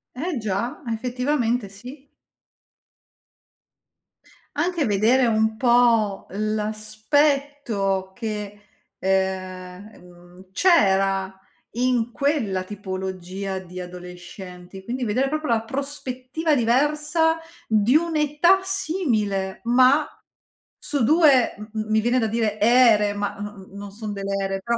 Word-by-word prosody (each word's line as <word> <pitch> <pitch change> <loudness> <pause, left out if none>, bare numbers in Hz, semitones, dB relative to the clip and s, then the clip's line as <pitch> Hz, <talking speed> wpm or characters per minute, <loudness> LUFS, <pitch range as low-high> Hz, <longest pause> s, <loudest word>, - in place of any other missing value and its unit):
Eh 315 +2 -3
già, 215 +3 -3
effettivamente 245 -1 -1
sì. 250 +8 -12 2.5
Anche 340 -4 0
vedere 225 +5 +3
un 220 -1 +1
po' 235 -5 +3
l'aspetto 215 0 -1
che, 210 -2 -5 0.4
ehm, 190 0 -2
mhmm, 180 +1 -17
c'era 195 - +2 0.4
in 245 -2 +1
quella 250 -9 0
tipologia 190 -1 -5
di 185 0 -8
adolescenti, 180 +1 -10
quindi 245 +4 -3
vedere 255 +6 +1
proprio 310 -2 -3
la 225 -1 0
prospettiva 275 +3 -3
diversa 295 +6 +2 0.3
di 220 +5 +3
un'età 320 +3 +3
simile, 235 - -1
ma 255 +5 +4 0.7
su 285 -4 -2
2 285 -2 +4
m 210 +1 -10 0.2
mi 220 0 +3
viene 240 +3 +2
da 225 - +1
dire 215 -1 -1
ere, 220 -3 +5
ma 205 0 -2
no 205 -2 -8
non 200 0 -8
son 210 0 -6
delle 195 0 -3
ere 195 0 -2
però, 235 +4 -1
220 Hz, 105 wpm, -23 LUFS, 195-265 Hz, 2.5 s, ere